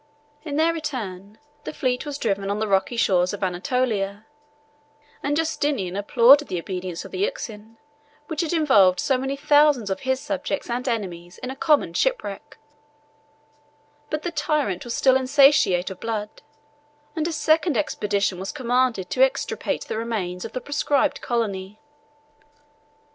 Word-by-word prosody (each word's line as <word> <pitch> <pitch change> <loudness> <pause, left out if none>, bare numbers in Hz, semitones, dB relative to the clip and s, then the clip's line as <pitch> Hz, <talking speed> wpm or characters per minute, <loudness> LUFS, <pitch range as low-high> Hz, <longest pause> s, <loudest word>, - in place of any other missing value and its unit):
In 295 -3 -5
their 325 +2 +3
return, 215 - -6 0.3
the - - -5
fleet 255 -1 -2
was 285 -1 -4
driven 200 -6 -1
on 200 - -1
the 220 0 -1
rocky 195 +4 +1
shores 180 -4 +2
of 205 - -5
Anatolia; 200 +2 -1 1.0
and 290 +1 0
Justinian 290 - -1
applauded 245 +8 +5
the 180 - -3
obedience 180 0 -5
of - - -10
the - - -5
Euxine, 225 - -4 0.5
which 320 +1 -3
had 330 - -2
involved 205 - +4
so 270 - +2
many 270 +1 -2
thousands 290 -6 +3
of 190 - -2
his 260 -1 -1
subjects 290 -3 -3
and 250 +2 -2
enemies 180 -7 -4
in 255 - -6
a - - -7
common 290 - +2
shipwreck: 205 - -2 1.5
but 305 0 -3
the 350 - -2
tyrant 295 - -1
was 240 -1 -4
still 260 -1 +4
insatiate 265 -9 +4
of 190 - -9
blood; 215 -2 -4 0.7
and 320 -1 -1
a - - -2
second 315 -2 +2
expedition 200 -4 -1
was 190 - -4
commanded 250 -7 0
to - - 0
extirpate - - -1
the 220 - -4
remains 190 -6 -3
of - - -7
the 255 - -3
proscribed 290 0 0
colony. 210 -4 -3
240 Hz, 150 wpm, -23 LUFS, 195-290 Hz, 1.5 s, applauded